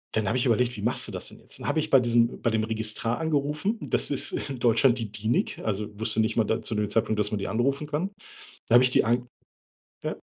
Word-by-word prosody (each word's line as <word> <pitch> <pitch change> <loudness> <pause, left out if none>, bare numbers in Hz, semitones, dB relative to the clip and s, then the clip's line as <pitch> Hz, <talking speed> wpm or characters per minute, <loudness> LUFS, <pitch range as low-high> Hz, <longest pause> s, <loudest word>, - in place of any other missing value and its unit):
dann 110 -2 0
habe 130 - +1
ich 125 - +1
überlegt, 120 0 +1
wie 100 - -6
machst 120 - +1
du - - -7
das - - -4
denn - - -14
jetzt? - - -10
Dann - - -9
habe - - +1
ich 155 0 -2
bei 135 - +6
diesem 120 -1 +2
bei 115 - 0
dem 110 0 +1
Registrar 110 +1 -1
angerufen, 155 +6 -1
das - - +1
ist 140 - 0 0.2
in 135 -3 -5
Deutschland 120 +2 +3
die 110 -3 -5
DENIC, 110 +3 -1
also, 105 0 -2
wusste 110 0 0
nicht 110 0 0
mal 115 - +3
da 110 +2 -1
zu 110 - -3
dem 105 -1 0
Zeitpunkt, 110 -1 +1
dass 105 0 +1
man 105 - -1
die 100 - -3
anrufen 140 +6 0
kann. 155 +7 -2 0.6
Dann 120 - +6
habe 125 - +7
ich - - +5
die - - +3
an 120 +2 0 0.8
ja, - - -2
115 Hz, 255 wpm, -26 LUFS, 110-130 Hz, 0.8 s, habe